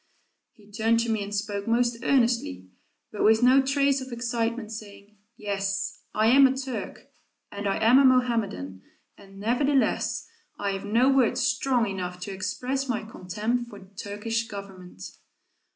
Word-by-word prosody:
He 210 -1 -21
turned 225 +2 +2
to 230 -1 -1
me 220 -2 0
and 200 - -7
spoke 200 0 -3
most 235 0 +1
earnestly, 230 - +1 0.4
but 210 - -3
with 220 +2 +4
no 260 +2 +6
trace 275 0 +1
of 260 0 -8
excitement, 235 -1 -2
saying, 210 -1 -10 0.2
"Yes, 200 -1 -3
I 215 - +2
am 265 +4 +7
a 265 0 -2
Turk, 265 -2 -6 0.4
and 205 0 -4
I 195 - 0
am 230 +4 +5
a 275 - +5
Mohammedan, 225 - +1 0.3
and 195 -1 -15
nevertheless, 265 +6 +1 0.3
I 200 -1 -1
have 195 +1 -5
no 230 +5 +3
words 255 -2 +2
strong 250 -1 +1
enough 180 -3 -5
to 200 - -5
express 255 +8 -3
my 230 -3 -1
contempt 220 +4 -3
for 205 - -11
the 195 0 -16
Turkish 220 +3 -3
Government." 190 - -10
225 Hz, 155 wpm, -26 LUFS, 200-250 Hz, 0.4 s, am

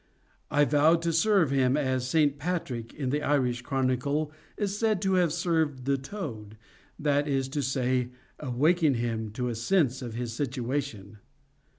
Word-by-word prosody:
I 145 0 +3
vowed 155 +3 +3
to 170 -1 0
serve 170 -2 +3
him 135 0 +3
as 130 -3 0
St. 145 -1 +2
Patrick, 140 -8 -3
in 135 -3 -2
the 150 +1 0
Irish 125 -5 +1
chronicle, 135 +4 0 0.3
is 200 -2 -1
said 215 -2 +1
to 190 0 +2
have 180 -3 +3
served 160 -6 0
the 140 0 +2
toad,—that 135 - -4
is 135 -2 0
to 145 +2 -2
say, 130 -1 0 0.3
"awaken 150 +3 +2
him 115 -2 -2
to 125 +2 -2
a 120 - -1
sense 130 - +1
of 120 -3 -6
his 120 -1 -4
situation." 125 -5 -3
140 Hz, 155 wpm, -28 LUFS, 125-155 Hz, 0.3 s, I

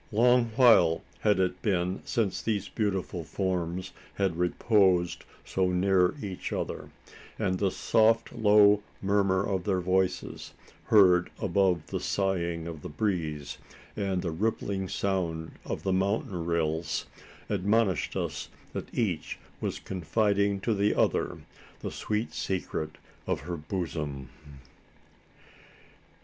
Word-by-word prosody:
Long 120 +3 +4
while 110 -10 +5 0.2
had 105 -3 +2
it 90 -1 0
been 90 -2 0
since 115 -7 0
these 105 -3 -1
beautiful 95 -5 -2
forms 90 +1 -2 0.2
had 95 -4 0
reposed 90 0 +2 0.2
so 95 -1 0
near 90 0 +3
each 95 -3 -5
other; - - -4 0.5
and 95 -4 0
the 100 - +2
soft 115 +3 +2
low 105 -2 +5 0.2
murmur 100 -1 +2
of 95 -3 -1
their 95 -1 +1
voices 95 +1 -1 0.3
heard 90 -4 +5
above 95 -5 +1
the - - -3
sighing 85 -4 -1
of 80 -3 -7
the - - -7
breeze, 75 -4 -2 0.4
and 95 -3 -1
the 85 - -1
rippling 100 +1 -1
sound 85 -5 -2
of - - -4
the 95 - +1
mountain 95 -2 -1
rills 80 -1 -1 0.4
admonished 105 -2 +1
us - - -3 0.2
that - - -5
each 95 -9 -2 0.2
was - - -2
confiding 100 +2 0
to 115 - +1
the 105 0 +2
other - - +1 0.4
the - - -4
sweet 105 -4 -2
secret 80 -1 -3 0.3
of - - -1
her 90 - -4
bosom! 75 -6 -4
95 Hz, 120 wpm, -28 LUFS, 85-105 Hz, 0.5 s, while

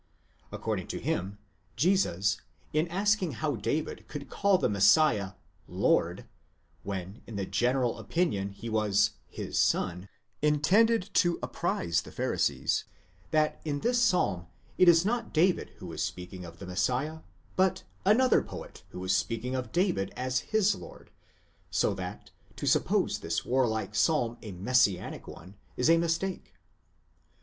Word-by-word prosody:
According - - -3
to - - -4
him, 95 +3 -2 0.4
Jesus, 105 - +2 0.3
in 155 +3 +2
asking 195 -1 +1
how 150 -3 -1
David 150 +8 -3
could 145 -2 -8
call 200 -1 +3
the - - +1
Messiah, 100 -1 +4 0.4
Zovd, 90 +2 +1 0.6
when 95 +2 -6
in 115 - -8
the 100 -1 -2
general 125 +3 0
opinion 130 - -1
he 100 +4 -9
was 105 -1 +2 0.2
his - - -3
son, 90 +3 +1 0.3
intended 185 +9 +3
to 175 -1 +3
apprise 85 -1 -1
the - - -12
Pharisees, - - 0 0.4
that 155 0 +1
in 145 -2 -2
this 240 0 +2
Psalm 100 - +2 0.3
it 185 - +8
is 165 +1 +5
not 235 -1 -1
David 180 +3 +3
who 90 -3 -8
is 80 - -4
'speaking 90 +3 -5
of 85 0 -11
the 95 - -9
Messiah, 125 - -1 0.4
but 190 0 +2 0.2
another 240 +6 +4
poet - - -9
who 90 - -7
is 95 0 +2
speaking 115 +5 -2
of 125 -3 -3
David 175 - +1
as 130 0 0
his 210 -2 +3
lord, - - -12 0.6
so - - +1
that - - -7 0.2
to - - -5
suppose - - +2
this 80 0 -2
warlike 110 -5 0
psalm 120 0 +1
a 105 - -7
messianic 100 0 +1
one, 95 +4 -11 0.2
is 125 - +2
ἃ 165 0 +6
mistake. 165 - -2
125 Hz, 140 wpm, -29 LUFS, -, 0.6 s, it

